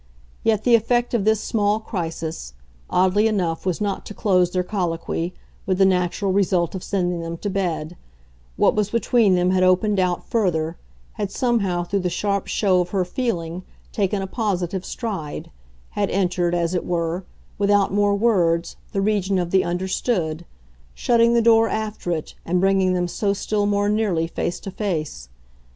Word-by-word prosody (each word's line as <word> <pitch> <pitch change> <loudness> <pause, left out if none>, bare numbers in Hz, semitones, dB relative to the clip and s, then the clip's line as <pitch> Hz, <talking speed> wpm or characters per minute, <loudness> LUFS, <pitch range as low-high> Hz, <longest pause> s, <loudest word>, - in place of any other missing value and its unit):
Yet 215 -2 +2
the 245 - +3
effect 240 +2 +2
of 220 -4 +1
this 220 -1 +3
small 210 -1 +1
crisis, 165 - -5 0.3
oddly 190 +4 +3
enough, 185 -5 -1
was 180 - 0
not 205 -2 -2
to 210 - -8
close 180 -4 +2
their 180 0 -1
colloquy, 175 -3 -2 0.4
with 185 -1 +1
the 195 - +5
natural 185 +1 +1
result 185 -4 +1
of 190 - -5
sending 180 -3 -1
them 165 0 -5
to 205 +3 -3
bed: 175 -4 -2 0.6
what - - +4
was 210 -1 0
between 230 -3 +3
them 180 +1 +2
had 185 0 +2
opened 185 +3 +3
out 180 -1 0
further, 170 -7 0 0.5
had 205 - -1
somehow, 200 -7 0
through 200 +3 -1
the 180 -1 -1
sharp 200 +2 -1
show 185 -4 +2
of 180 - -3
her 185 -1 0
feeling, 180 -6 -3 0.3
taken 195 -1 0
a - - -2
positive 190 -3 -2
stride, 195 -13 -5 0.4
had 205 -1 -1
entered, 180 -2 0
as 170 0 0
it 180 - 0
were, 170 +1 -2 0.4
without 200 -1 +3
more 205 0 +3
words, 175 -6 +1 0.2
the 195 - 0
region 200 -2 +1
of 175 -1 -1
the 190 -1 +4
understood, 175 -2 -1 0.5
shutting 235 - +3
the 235 - +3
door 225 -1 +5
after 215 -4 -3
it 160 -3 -3
and 180 +2 0
bringing 190 -1 +3
them 180 -1 0
so 200 +3 0
still 205 +1 -1
more 205 0 +1
nearly 205 -6 +1
face 170 +1 -3
to 195 - -7
face. 155 - -3
190 Hz, 170 wpm, -22 LUFS, 175-210 Hz, 0.6 s, the